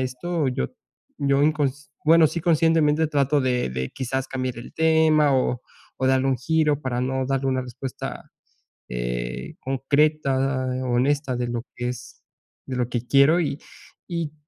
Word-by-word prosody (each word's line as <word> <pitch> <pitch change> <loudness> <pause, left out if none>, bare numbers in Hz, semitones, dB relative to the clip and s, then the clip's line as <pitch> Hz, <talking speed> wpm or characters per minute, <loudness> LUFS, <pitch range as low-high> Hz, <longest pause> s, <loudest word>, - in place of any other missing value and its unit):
esto, 135 +5 -1
yo 125 - -1 0.5
yo 140 0 +2
incons 145 -2 0 0.2
bueno, 165 +1 +6
sí, 170 - -4
conscientemente 160 -2 +3
trato 145 0 +2
de 125 - 0
de, 65 0 -3
quizás, 130 0 -3
cambiar 130 -2 -3
el 120 - -10
tema, 160 -2 +4
o 125 -1 0 0.4
o 130 - 0
darle 130 0 +3
un 135 - +2
giro 150 +2 +1
para 125 -2 -2
no 130 +1 -1
darle 135 0 0
una 130 -1 0
respuesta, 125 +1 -7 0.6
eh, - - -4
concreta, 140 +2 +1 0.5
honesta 130 +2 +1
de 125 - -1
lo 120 -1 -3
que 120 0 -2
es 125 0 -9 0.5
de 130 - -4
lo 125 -2 0
que 120 0 -3
quiero. 140 +5 +5
Y 150 -4 -1 0.5
y 165 -4 -3
135 Hz, 155 wpm, -24 LUFS, 125-150 Hz, 0.6 s, bueno